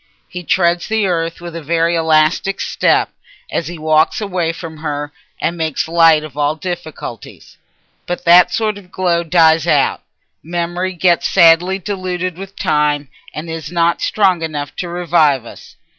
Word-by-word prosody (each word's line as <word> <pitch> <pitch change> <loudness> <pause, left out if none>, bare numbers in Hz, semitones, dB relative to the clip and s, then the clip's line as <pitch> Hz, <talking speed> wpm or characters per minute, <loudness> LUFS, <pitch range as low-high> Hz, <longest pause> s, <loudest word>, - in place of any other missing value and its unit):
He 180 - -7
treads 175 0 +1
the 220 -1 0
earth 165 -2 -2
with 170 -1 -8
a 165 - -5
very 165 +2 0
elastic 160 +4 +1
step - - +1 0.4
as 165 - -2
he 175 0 -7
walks 155 0 +2
away 180 -5 -1
from 165 -1 -9
her, 145 -1 -4 0.3
and 170 - -1
makes 160 -3 -2
light 165 -2 +4
of 155 -4 -10
all 145 +1 0
difficulties. 160 - -8 0.5
But 175 - -4
that 175 +1 +6
sort 215 -2 -1
of 180 -2 -19
glow 175 -2 0
dies 160 -1 +3
out: 145 -4 +2 0.4
memory 175 +2 -3
gets 175 0 +2
sadly 170 +3 +4
diluted 185 -2 -4
with 195 +2 -10
time, 150 -2 0 0.2
and 155 +2 -7
is 160 -1 -6
not 170 -1 +1
strong 190 -5 +2
enough 145 -4 -5
to 175 - -4
revive 165 -7 +1
us. - - -13
170 Hz, 160 wpm, -16 LUFS, 155-180 Hz, 0.5 s, that